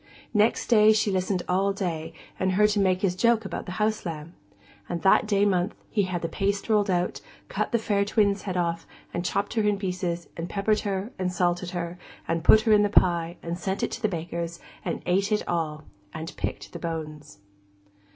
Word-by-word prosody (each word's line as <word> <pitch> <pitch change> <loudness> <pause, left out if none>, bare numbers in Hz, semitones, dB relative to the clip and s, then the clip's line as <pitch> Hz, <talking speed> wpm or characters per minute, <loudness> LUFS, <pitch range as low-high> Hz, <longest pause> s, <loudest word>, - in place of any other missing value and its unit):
Next 215 +1 +3
day 215 -2 +6
she 215 -1 +1
listened 185 -1 0
all 195 +2 +2
day, 170 -5 -3 0.3
and 185 0 +1
heard 210 +2 +4
him 205 - +2
make 185 0 +2
his 180 -2 +2
joke 230 +2 +3
about 195 - -5
the 180 - -4
house 215 +3 0
lamb. 165 -1 -6 0.6
And 170 -1 -3
that 195 +2 +5
day 205 -1 +3
month, 185 0 +1 0.2
he 210 - +2
had 180 -2 -3
the - - 0
paste 200 +4 -1
rolled 210 -2 +3
out, 180 -1 0
and - - -24
cut - - -2
the 235 - +3
fair 205 -3 +1
twin's 200 -1 +2
head 185 -2 -3
off, 170 -1 -1 0.3
and 175 - -2
chopped 200 +2 -1
her 225 - +1
in 210 -1 +2
pieces, 180 -3 -3
and 170 +1 -5
peppered 210 +1 +1
her, 200 +2 -3
and 185 -1 0
salted 175 0 0
her, 175 0 -4 0.3
and 165 0 -1
put 220 +5 +7
her 220 0 +1
in 210 - +6
the 205 - +2
pie, 170 -3 +2
and 170 +1 -4
sent 190 +2 -2
it - - 0
to - - -5
the 215 - +2
baker's, 170 -1 -4 0.2
and - - -3
ate 195 +4 +1
it 210 - 0
all, 155 -3 -2 0.3
and 160 +2 -6
picked - - -5
the - - -6
bones. 155 - -6
185 Hz, 210 wpm, -26 LUFS, 170-205 Hz, 0.6 s, put